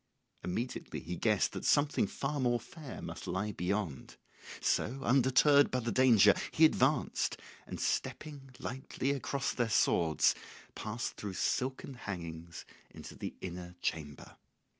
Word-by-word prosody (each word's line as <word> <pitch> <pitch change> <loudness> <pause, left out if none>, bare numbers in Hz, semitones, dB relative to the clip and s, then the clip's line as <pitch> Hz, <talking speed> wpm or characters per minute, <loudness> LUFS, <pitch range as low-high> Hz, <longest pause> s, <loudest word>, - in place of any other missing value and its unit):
Immediately 115 +8 -4
he 90 +2 -5
guessed - - +2
that - - -6
something 145 0 +3
far 145 +1 -3
more 120 -2 +2
fair 150 +3 -9
must - - -7
lie 100 +3 -1
beyond; 90 -5 -3 0.4
so, 130 +5 0
undeterred 135 +3 +5
by 130 - 0
the 120 -1 -2
danger, 110 -4 +6 0.2
he 160 - +5
advanced, 150 -1 +2 0.3
and - - -6
stepping 145 -3 -3
lightly 130 +1 -3
across 140 -1 -1
their 120 -2 0
swords 85 -6 +3 0.4
passed 110 +2 -4
through 100 -2 -5
silken 130 +6 -1
hangings 85 -7 -7 0.3
into - - -10
the - - -6
inner 90 -1 -7
chamber. 75 -5 -4
120 Hz, 130 wpm, -33 LUFS, 90-135 Hz, 0.4 s, danger